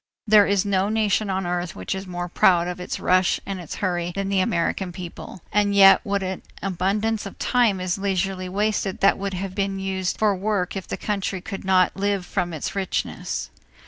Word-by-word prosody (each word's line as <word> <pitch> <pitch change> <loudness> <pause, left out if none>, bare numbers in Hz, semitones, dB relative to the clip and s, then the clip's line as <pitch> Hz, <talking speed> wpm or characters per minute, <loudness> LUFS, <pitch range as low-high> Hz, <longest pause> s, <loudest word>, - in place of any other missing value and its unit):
There 210 -2 +6
is 200 0 +2
no 195 0 +1
nation 215 -2 +1
on 190 -1 -1
earth 175 -1 -2
which 95 - -3
is 190 0 -6
more 175 -1 -4
proud 175 0 +3
of 180 0 -5
its 180 - -4
rush 185 0 +3
and 195 -1 -4
its 170 - -7
hurry 175 -1 -1
than 195 0 -2
the 195 -1 +2
American 180 +1 0
people; 175 -1 -9
and 205 0 +2
yet 195 -1 +8
what 200 -3 -1
an 185 0 -4 0.2
abundance 200 +3 0
of 195 - -11
time 235 -6 +2
is 185 +1 -2
leisurely 190 -1 -1
wasted 200 0 -1
that 195 - +4
would 195 -1 -3
have 190 +1 -4
to 195 0 0
be 195 -1 -5
used 190 -1 -2
for 210 -2 +2
work 195 -1 -1
if 190 - -5
the - - -4
country 200 -2 -2
could 195 +2 -7
not 185 -1 +3
live 200 -1 -1
from 175 0 -2
its 155 +3 -4
richness. 195 -1 -3
190 Hz, 205 wpm, -23 LUFS, 180-200 Hz, 0.2 s, yet